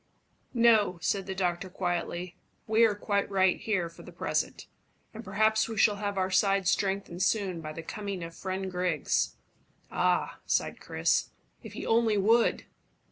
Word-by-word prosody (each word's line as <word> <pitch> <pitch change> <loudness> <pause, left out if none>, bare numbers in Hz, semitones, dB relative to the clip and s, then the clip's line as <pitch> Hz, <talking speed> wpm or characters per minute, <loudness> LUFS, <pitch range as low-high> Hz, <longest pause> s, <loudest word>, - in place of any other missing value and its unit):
"No," 225 -6 +4
said 195 +4 -1
the 190 - -4
doctor 185 0 -1
quietly. 175 -1 -3 0.3
"We 220 +1 +4
are 215 -2 +1
quite 200 -1 -1
right 190 -2 +2
here 195 -6 -1
for 165 - -13
the - - -12
present, - - -2 0.5
and 220 +1 -8
perhaps 220 +3 +2
we 225 - -5
shall 205 0 +4
have 200 -1 -3
our 190 0 0
side 195 0 +2
strengthened 195 -2 0
soon 190 -3 0
by 155 -1 -6
the 165 - -7
coming 200 0 -5
of 165 0 -7
friend 190 +1 -4
Griggs." 180 -4 0 0.6
"Ah!" - - 0
sighed - - 0
Chris, - - 0 0.3
"if - - -10
he - - -6
only 225 -2 +3
would!" 225 +4 +3
195 Hz, 160 wpm, -29 LUFS, 180-210 Hz, 0.6 s, No